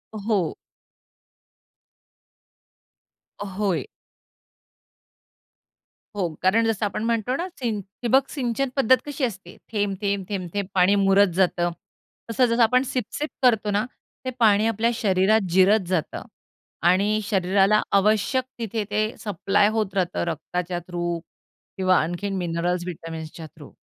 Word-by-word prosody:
हो. 205 -5 -1 2.9
होय. 195 - -2 2.3
हो, 180 -4 -1
कारण 225 +5 +3
जसं 220 -1 0
आपण 205 +2 -3
म्हणतो 230 +2 0
ना, 345 +4 -3
सिन 225 -5 -1 0.2
ठिबक 265 +3 +3
सिंचन 265 -1 -2
पद्धत 260 -2 +5
कशी 290 -1 -5
असते. 200 -6 -4
थेंब-थेंब-थेंब-थेंब 200 -2 -2
पाणी 185 +2 +5
मुरत 195 -1 +4
जातं, 175 -2 +2 0.6
तसं 250 +3 +3
जसं 235 0 +1
आपण 250 +3 +3
सीप-सीप 265 +4 -3
करतो 220 -4 +3
ना, 205 +2 +1 0.4
ते 255 - -1
पाणी 215 -1 +4
आपल्या 225 +1 +1
शरीरात 205 0 +2
जिरत 190 +5 +5
जातं 180 -4 -2 0.6
आणि 200 +4 +3
शरीराला 195 +1 +3 0.2
आवश्यक 215 +6 +2 0.2
तिथे 225 -1 -2
ते 210 +1 +1 0.2
सप्लाय 205 +1 +1
होत 215 -3 -1
राहतं. 180 -2 0
रक्ताच्या 175 +2 -3
थ्रू 175 -1 -2 0.6
किंवा 185 -1 +3
आणखीन 175 +5 -3
मिनरल्स, 175 0 -1
व्हिटॅमिन्सच्या 165 -2 -7
थ्रू 150 -3 -13
200 Hz, 115 wpm, -24 LUFS, 185-225 Hz, 2.9 s, पद्धत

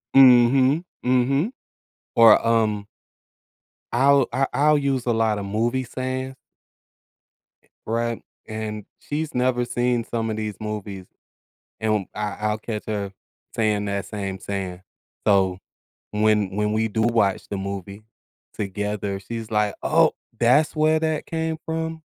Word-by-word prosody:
Mhm. 130 +4 +6 0.2
Mhm. 135 - +2 0.7
Or, 115 -1 +7
um 110 -3 +1 1.1
I'll 135 +1 +4
I 135 +1 +1
I'll 150 +1 +4
use 135 -3 0
a 120 - +2
lot 110 -2 +1
of 100 - -5
movie 120 +6 0
sayings 130 +1 -4 1.3
E - - -31 0.2
Right, 115 +1 -1 0.3
and 110 -1 -5
she's 150 +1 -4
never 125 -1 +1
seen 120 -1 0
some 115 -1 -3
of 110 - -3
these 105 -2 -3
movies, 105 -3 -5 0.8
and 110 -3 0
I 105 -1 -3
I'll 105 0 0
catch 110 -1 -5
her 100 -2 -3 0.4
saying 105 -2 +1
that 100 -1 -2
same 100 -3 -4
saying, 95 -2 -4 0.4
so 95 -2 +3 0.5
when 105 -2 +2
when 105 0 +1
we 110 +1 +1
do 110 +1 -1
watch 110 -4 +1
the 100 - -3
movie 100 +1 -6 0.5
together, 100 0 -3
she's 115 +2 -6
like, 105 -1 +1
"Oh, - - +4 0.3
that's 130 +8 +4
where 155 +1 +3
that 160 -1 -1
came 160 -1 -2
from?" 160 0 -3
110 Hz, 135 wpm, -23 LUFS, 105-130 Hz, 1.3 s, Or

